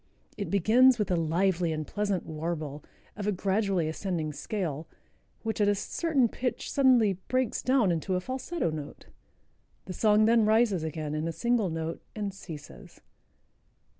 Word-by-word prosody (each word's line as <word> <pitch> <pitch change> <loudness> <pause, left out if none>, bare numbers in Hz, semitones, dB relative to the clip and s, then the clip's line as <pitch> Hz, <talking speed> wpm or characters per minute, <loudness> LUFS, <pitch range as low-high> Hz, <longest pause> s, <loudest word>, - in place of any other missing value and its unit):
It 200 - -4
begins 235 +7 +5
with 210 -4 -1
a - - +3
lively 170 +1 +1
and 155 -1 -3
pleasant 205 -1 -2
warble, 155 -2 -4 0.3
of 205 -1 -4
a - - +3
gradually 195 -2 0
ascending 160 -2 -3
scale, 160 -4 -4 0.6
which 220 -1 -2
at 205 - +4
a 205 - +3
certain 280 - +1
pitch 250 +3 -3
suddenly 240 -9 +4
breaks 255 -3 0
down 255 -7 +3
into 170 +3 -1
a - - +1
falsetto 260 - -3
note. 150 -2 -7 0.8
The 185 - -6
song 215 +2 +4
then 230 0 +4
rises 215 -4 +3
again 155 -1 -4
in 155 +1 -2
a - - -1
single 235 0 +1
note 165 0 -4
and 205 -2 -3
ceases." 150 - -11
195 Hz, 155 wpm, -28 LUFS, 160-220 Hz, 0.8 s, begins